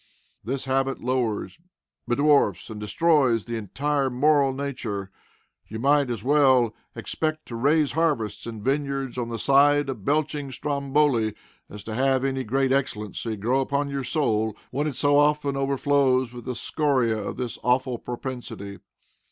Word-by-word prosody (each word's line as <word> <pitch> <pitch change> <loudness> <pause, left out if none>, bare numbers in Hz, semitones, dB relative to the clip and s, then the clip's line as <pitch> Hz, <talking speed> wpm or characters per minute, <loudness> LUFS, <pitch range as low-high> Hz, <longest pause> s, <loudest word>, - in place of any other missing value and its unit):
This 135 +3 -3
habit 135 0 0
lowers, 125 +1 -1 0.5
bedwarfs, 140 -1 +2
and 105 - -7
destroys 120 +1 +2
the 120 - -4
entire 135 +6 -1
moral 140 +2 +3
nature. 120 -8 -4 0.6
You 110 - -6
might 140 +2 +3
as 115 -4 -4
well 130 -5 +4 0.2
expect 155 -1 -3
to 120 - -5
raise 145 +5 +2
harvests 150 -11 -1
and 110 -3 -7
vineyards 135 -2 -1
on 120 -1 -3
the 115 - -3
side 140 +3 +4
of 120 -7 -5
belching 145 +1 -1
Stromboli 140 -4 0 0.3
as 105 -1 -9
to 110 - -6
have 130 +2 +1
any 135 -1 -1
great 135 +3 0
excellency 115 -5 -2
grow 120 +6 +1
upon 140 +1 -1
your 140 -1 -2
soul 110 -6 0
when 145 +4 -1
it 145 - -3
so 145 +2 +3
often 145 -1 +2
overflows 135 -2 +1
with 120 -1 -9
the 125 - -3
scoriæ 130 -2 0
of - - -5
this 125 -2 -4
awful 125 -1 +1
propensity. 120 -5 -6
135 Hz, 150 wpm, -25 LUFS, 115-145 Hz, 0.6 s, well